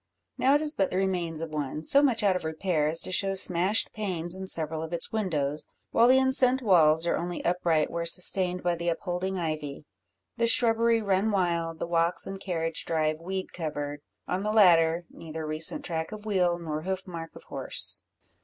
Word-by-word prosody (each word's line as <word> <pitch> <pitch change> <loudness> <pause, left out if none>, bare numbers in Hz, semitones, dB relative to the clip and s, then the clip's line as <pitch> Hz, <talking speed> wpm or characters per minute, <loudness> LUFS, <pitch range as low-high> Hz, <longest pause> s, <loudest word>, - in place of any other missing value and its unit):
Now 270 +2 +2
it 295 - +1
is 305 -1 +1
but 195 -8 0
the 185 - -3
remains 175 -4 -2
of 160 -1 -6
one, 150 +1 -4
so 275 - +6
much 245 -6 +1
out 195 -2 +2
of 180 - -4
repair 160 -1 -1
as 160 +2 +6
to - - +4
show 195 +1 0
smashed 185 +3 +2
panes 180 -5 -2
in 190 0 -7
several 160 -2 +2
of 160 +1 -7
its 170 - +3
windows, 155 -9 -2 0.2
while 235 - +4
the 260 +1 +5
enceinte 260 0 +4
walls 165 -5 +4
are 170 - 0
only 175 +1 -5
upright 170 -3 0
where 170 0 -3
sustained 180 +1 0
by 175 0 +1
the 170 0 -3
upholding 180 +3 -3
ivy; 155 -4 -5 0.5
the 230 - +1
shrubbery 230 -1 +3
run 200 +1 0
wild; 170 -4 -1
the - - -4
walks 170 +1 -1
and 195 0 -7
carriage 165 -4 -4
drive 155 -1 -1
weed 190 +2 -6
covered; 145 -3 -5 0.3
on 180 +1 -2
the 210 +1 -2
latter 170 -5 +4
neither 160 -1 -8
recent 160 - +3
track 160 -2 -4
of 215 0 -9
wheel, 180 -5 0
nor 155 -3 -5
hoof 190 +2 -4
mark 165 -3 -9
of - - -13
horse. - - -3
175 Hz, 195 wpm, -26 LUFS, 160-195 Hz, 0.5 s, so